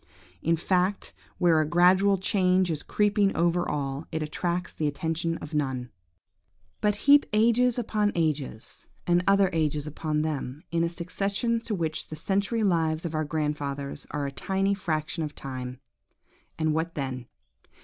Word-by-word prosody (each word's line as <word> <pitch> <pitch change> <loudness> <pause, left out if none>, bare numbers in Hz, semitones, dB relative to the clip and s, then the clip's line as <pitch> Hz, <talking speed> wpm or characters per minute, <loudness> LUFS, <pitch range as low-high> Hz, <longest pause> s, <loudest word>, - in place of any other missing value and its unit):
In 165 +1 +2
fact, 185 +3 0 0.2
where 165 -3 +4
a 155 - -1
gradual 185 +3 +5
change 185 -1 +2
is 150 -2 -2
creeping 205 -1 +2
over 175 +1 +1
all, 140 0 -3
it 160 -1 -2
attracts 175 +3 -2
the 155 - -1
attention 165 +3 -1
of 150 - -9
none. 130 -5 -2 0.9
But 210 -1 +2
heap 285 +1 +7
ages 235 +3 +3
upon 210 -3 +1
ages, 150 -9 -2 0.2
and 175 0 +3
other 195 -1 +4
ages 150 -2 0
upon 150 0 -2
them, 145 -2 -4
in 170 0 +1
a 170 - +1
succession 200 +7 -1
to 215 - -1
which 160 -3 -2
the 155 - -7
century 200 +7 0
lives 165 -4 +1
of 165 - -3
our 155 0 0
grandfathers 145 -2 -3
are 145 -1 -2
a 140 - -3
tiny 195 +7 0
fraction 160 -3 -2
of 150 -1 -5
time, 130 -1 -6 0.8
and 155 -1 +1
what 165 +2 -2
then? 130 -4 -4
165 Hz, 155 wpm, -27 LUFS, 150-195 Hz, 0.9 s, heap